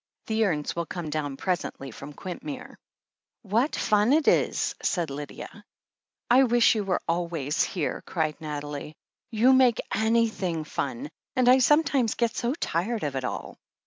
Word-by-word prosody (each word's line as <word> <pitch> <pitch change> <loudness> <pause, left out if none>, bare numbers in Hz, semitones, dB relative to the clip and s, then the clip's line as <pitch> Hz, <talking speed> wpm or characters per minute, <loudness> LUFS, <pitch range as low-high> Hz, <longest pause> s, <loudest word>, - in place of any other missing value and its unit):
The 220 0 +1
urns 150 -7 -1
will 170 -1 -2
come 170 -4 -5
down 145 -3 -3
presently 175 -7 -3
from 140 +6 -9
Quintmere." 250 - -7 0.7
"What 230 +8 +1
fun 210 +4 +3
it 315 0 +2
is - - +2
!" - - -21
said 170 -6 0
Lydia. 145 +1 -8 0.6
"I 250 +2 +6
wish 240 -1 +4
you 215 -2 -1
were 190 -2 -1
always 165 -2 -1
here!" 170 -6 -1
cried 160 -2 -2
Nathalie. 150 0 -5 0.3
"You'd 240 +3 +4
make 255 -3 +5
anything 220 -6 +1
ftm, 240 - -4 0.3
and 255 -1 +2
I 255 +1 +7
sometimes 275 -4 +3
get 235 -2 0
so 240 +4 -1
tired 215 - -2
of 145 -2 -2
it 130 - -2
all." - - -5
195 Hz, 155 wpm, -26 LUFS, 155-240 Hz, 0.7 s, I